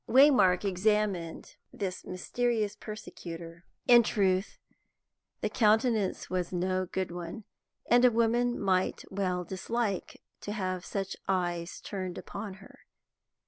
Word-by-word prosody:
Waymark 255 Hz, -9 st, +6 dB
examined 195 Hz, -3 st, 0 dB
this 185 Hz, -2 st, -4 dB
mysterious 215 Hz, +3 st, -1 dB
persecutor. 170 Hz, -6 st, -8 dB, 0.2 s
In 240 Hz, -1 st, +9 dB
truth, 195 Hz, -3 st, +1 dB, 0.8 s
the -, -, 0 dB
countenance 220 Hz, -2 st, +2 dB
was 180 Hz, -1 st, -2 dB
no 185 Hz, +1 st, 0 dB
good 185 Hz, 0 st, -2 dB
one, 175 Hz, +4 st, -6 dB, 0.4 s
and 240 Hz, +1 st, +5 dB
a 250 Hz, -, +8 dB
woman 235 Hz, +1 st, +2 dB
might 190 Hz, -2 st, +1 dB
well 185 Hz, -2 st, -1 dB
dislike 200 Hz, +3 st, -3 dB, 0.2 s
to 205 Hz, -, -5 dB
have 185 Hz, -3 st, -2 dB
such 195 Hz, -1 st, -3 dB
eyes 175 Hz, -2 st, -1 dB
turned 185 Hz, -3 st, -5 dB
upon 200 Hz, -1 st, -6 dB
her. 195 Hz, +1 st, -16 dB
195 Hz, 115 wpm, -30 LUFS, 180-220 Hz, 0.8 s, In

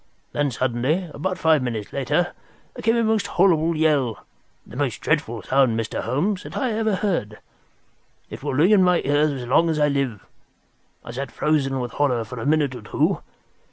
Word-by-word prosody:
Then 145 Hz, -1 st, 0 dB
suddenly, 130 Hz, +8 st, -1 dB
about 185 Hz, +5 st, -3 dB
five 160 Hz, -4 st, +3 dB
minutes 115 Hz, -5 st, -4 dB
later, 140 Hz, +6 st, 0 dB, 0.4 s
there -, -, -8 dB
came 225 Hz, +1 st, +2 dB
a 230 Hz, -, +2 dB
most 220 Hz, -1 st, +1 dB
horrible 170 Hz, -3 st, +2 dB
yell—the 145 Hz, -8 st, -2 dB
most -, -, -1 dB
dreadful -, -, -1 dB
sound, 130 Hz, -4 st, +2 dB
Mr. 115 Hz, -, -3 dB
Holmes, 180 Hz, +9 st, -1 dB
that -, -, -8 dB
ever 225 Hz, -4 st, 0 dB
I 190 Hz, -, -3 dB
heard. 110 Hz, -, -1 dB, 0.9 s
It -, -, -8 dB
will -, -, -3 dB
ring 165 Hz, +9 st, +4 dB
in 205 Hz, -3 st, +6 dB
my 180 Hz, -1 st, +3 dB
ears 145 Hz, +2 st, +3 dB
as -, -, -8 dB
long 165 Hz, +6 st, +3 dB
as 160 Hz, -, 0 dB
I 150 Hz, -1 st, +3 dB
live. 135 Hz, -7 st, -2 dB, 0.8 s
I -, -, -7 dB
sat 130 Hz, +1 st, -5 dB
frozen 135 Hz, -3 st, 0 dB
with 120 Hz, -2 st, -4 dB
horror 125 Hz, -5 st, +1 dB
for 125 Hz, +2 st, -8 dB
a 115 Hz, -, -3 dB
minute 150 Hz, -3 st, +2 dB
or 125 Hz, -, -8 dB
two. 105 Hz, -, 0 dB
145 Hz, 185 wpm, -23 LUFS, 125-175 Hz, 0.9 s, in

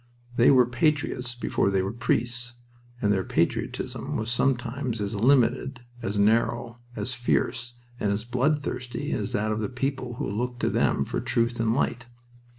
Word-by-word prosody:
They 120 Hz, -, +6 dB
were 130 Hz, -3 st, +7 dB
patriots 125 Hz, -1 st, 0 dB
before 120 Hz, -, 0 dB
they 95 Hz, -1 st, +1 dB
were 95 Hz, +2 st, -3 dB
priests, 120 Hz, +1 st, 0 dB, 0.5 s
and 105 Hz, 0 st, +4 dB
their 95 Hz, -1 st, 0 dB
patriotism -, -, -1 dB
was 110 Hz, +2 st, -2 dB
sometimes 125 Hz, -1 st, 0 dB
as 100 Hz, 0 st, -2 dB
limited, 125 Hz, +2 st, +2 dB, 0.2 s
as 105 Hz, -2 st, -2 dB
narrow, 115 Hz, +3 st, +2 dB, 0.2 s
as 130 Hz, -, -2 dB
fierce, 120 Hz, 0 st, -1 dB, 0.2 s
and 100 Hz, -, +1 dB
as 105 Hz, +2 st, -2 dB
bloodthirsty 125 Hz, 0 st, -1 dB
as -, -, -2 dB
that 110 Hz, +1 st, 0 dB
of 110 Hz, -, -1 dB
the 105 Hz, -, -2 dB
people 130 Hz, -1 st, -3 dB
who 145 Hz, -, -3 dB
looked 120 Hz, +4 st, -3 dB
to -, -, +1 dB
them 70 Hz, -, +2 dB
for -, -, -2 dB
truth 115 Hz, 0 st, 0 dB
and 115 Hz, 0 st, +2 dB
light. 120 Hz, -3 st, -1 dB
120 Hz, 160 wpm, -26 LUFS, 110-125 Hz, 0.5 s, were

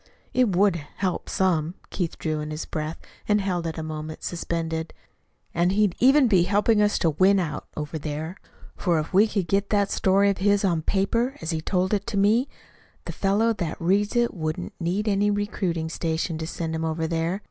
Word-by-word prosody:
"It 245 Hz, -7 st, +2 dB
would 195 Hz, -1 st, +4 dB
help 175 Hz, +4 st, -4 dB
some." 175 Hz, -3 st, +1 dB, 0.2 s
Keith 175 Hz, -4 st, -3 dB
drew 155 Hz, -1 st, -2 dB
in 150 Hz, 0 st, -4 dB
his 155 Hz, +1 st, -4 dB
breath 155 Hz, +1 st, -4 dB, 0.3 s
and 210 Hz, 0 st, +3 dB
held 180 Hz, -4 st, -1 dB
it 160 Hz, -, -5 dB
a 160 Hz, -, -3 dB
moment 155 Hz, 0 st, -6 dB
suspended. 165 Hz, -1 st, -3 dB, 0.6 s
"And 175 Hz, +2 st, +2 dB
he'd 205 Hz, -2 st, +3 dB
even 270 Hz, +2 st, +6 dB
be 190 Hz, -6 st, +4 dB
helping 205 Hz, +4 st, +3 dB
us 210 Hz, 0 st, +3 dB
to 165 Hz, -, +2 dB
win 190 Hz, +6 st, +4 dB
out 155 Hz, -5 st, -3 dB
over 150 Hz, +1 st, -4 dB
there; 155 Hz, +4 st, -5 dB, 0.4 s
for 175 Hz, -3 st, +1 dB
if 155 Hz, +4 st, -3 dB
we 205 Hz, +4 st, +6 dB
could 200 Hz, -5 st, -2 dB
get 200 Hz, +1 st, +1 dB
that 200 Hz, -2 st, +2 dB
story 200 Hz, +1 st, +3 dB
of 195 Hz, -, -5 dB
his 205 Hz, +1 st, +3 dB
on 170 Hz, -4 st, +1 dB
paper 230 Hz, -, 0 dB
as 160 Hz, +1 st, -3 dB
he 160 Hz, -1 st, -2 dB
told 185 Hz, +3 st, 0 dB
it 205 Hz, +2 st, -1 dB
to 220 Hz, -3 st, -2 dB
me, 215 Hz, +7 st, +3 dB, 0.6 s
the -, -, -4 dB
fellow 210 Hz, +4 st, +2 dB
that 175 Hz, -7 st, -4 dB
reads 200 Hz, +6 st, +1 dB
it 240 Hz, 0 st, +2 dB
wouldn't 155 Hz, -, -4 dB
need 185 Hz, +6 st, -1 dB
any 205 Hz, 0 st, +2 dB
recruiting 195 Hz, -5 st, -1 dB
station 160 Hz, 0 st, -2 dB
to 160 Hz, -, -4 dB
send 165 Hz, -1 st, -4 dB
him 160 Hz, 0 st, -2 dB
over 160 Hz, 0 st, -1 dB
there. 165 Hz, +3 st, -1 dB
180 Hz, 200 wpm, -25 LUFS, 160-205 Hz, 0.6 s, even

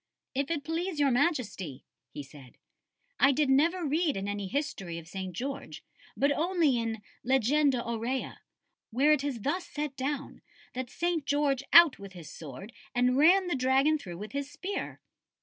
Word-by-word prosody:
"If 275 Hz, +1 st, -1 dB
it 310 Hz, -4 st, -2 dB
please 325 Hz, +1 st, -3 dB
Your 280 Hz, -2 st, +4 dB
Majesty," 240 Hz, -, -1 dB, 0.3 s
he 145 Hz, 0 st, -7 dB
said, 135 Hz, -2 st, -15 dB, 0.6 s
"I 275 Hz, -, +6 dB
did 280 Hz, 0 st, +2 dB
never 330 Hz, +6 st, +3 dB
read 300 Hz, -, +1 dB
in 195 Hz, +1 st, -3 dB
any 205 Hz, -1 st, -3 dB
history 195 Hz, -, -3 dB
of 165 Hz, -1 st, -9 dB
St. 190 Hz, +1 st, -5 dB
George, 240 Hz, -, -6 dB, 0.3 s
but 280 Hz, +1 st, +3 dB
only 315 Hz, -4 st, +2 dB
in 225 Hz, -2 st, -3 dB, 0.2 s
Legenda 265 Hz, +1 st, +2 dB
Aurea, 235 Hz, +3 st, -3 dB, 0.5 s
where 270 Hz, +6 st, +3 dB
it 300 Hz, -2 st, +3 dB
is 270 Hz, -6 st, -3 dB
thus 345 Hz, -, -2 dB
set 295 Hz, -2 st, -4 dB
down, 280 Hz, +1 st, -4 dB, 0.3 s
that 255 Hz, -1 st, -4 dB
St. 340 Hz, +1 st, -1 dB
George 285 Hz, -2 st, +1 dB
out 335 Hz, -4 st, +8 dB
with 195 Hz, -1 st, -10 dB
his 170 Hz, -4 st, -10 dB
sword 155 Hz, -, -9 dB, 0.2 s
and 250 Hz, +1 st, +3 dB
ran 355 Hz, +7 st, +5 dB
the 355 Hz, -, -1 dB
dragon 270 Hz, +3 st, +3 dB
through 175 Hz, -9 st, -8 dB
with 210 Hz, +3 st, -7 dB
his 280 Hz, 0 st, -3 dB
spear." 390 Hz, +6 st, -5 dB
270 Hz, 165 wpm, -29 LUFS, 215-300 Hz, 0.6 s, out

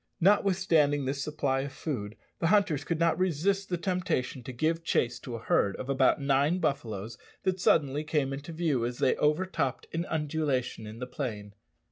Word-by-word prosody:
Notwithstanding 175 Hz, -7 st, +3 dB
this 135 Hz, +1 st, -2 dB
supply 140 Hz, -3 st, 0 dB
of 135 Hz, +1 st, -3 dB
food, 115 Hz, -9 st, -5 dB, 0.2 s
the 165 Hz, -, +1 dB
hunters 190 Hz, -7 st, +3 dB
could 170 Hz, -, -1 dB
not 170 Hz, +1 st, +2 dB
resist 185 Hz, +3 st, +1 dB
the 175 Hz, -, 0 dB
temptation 180 Hz, -8 st, -1 dB
to 125 Hz, -, -7 dB
give 160 Hz, +6 st, 0 dB
chase 125 Hz, -7 st, 0 dB
to 120 Hz, -, -6 dB
a -, -, -5 dB
herd 100 Hz, -1 st, +2 dB
of 130 Hz, -, -7 dB
about 135 Hz, 0 st, +3 dB
nine 140 Hz, +4 st, +2 dB
buffaloes 110 Hz, -, -3 dB, 0.2 s
that 185 Hz, -1 st, 0 dB
suddenly 150 Hz, -4 st, +2 dB
came 150 Hz, -3 st, 0 dB
into 145 Hz, +4 st, -6 dB
view 160 Hz, -7 st, 0 dB
as 120 Hz, +1 st, -2 dB
they 130 Hz, -, +2 dB
overtopped 150 Hz, -3 st, 0 dB
an 170 Hz, +2 st, -2 dB
undulation 145 Hz, -7 st, -1 dB
in 110 Hz, +1 st, -8 dB
the 125 Hz, -, -4 dB
plain. 110 Hz, -6 st, -5 dB
145 Hz, 175 wpm, -29 LUFS, 130-170 Hz, 0.2 s, Notwithstanding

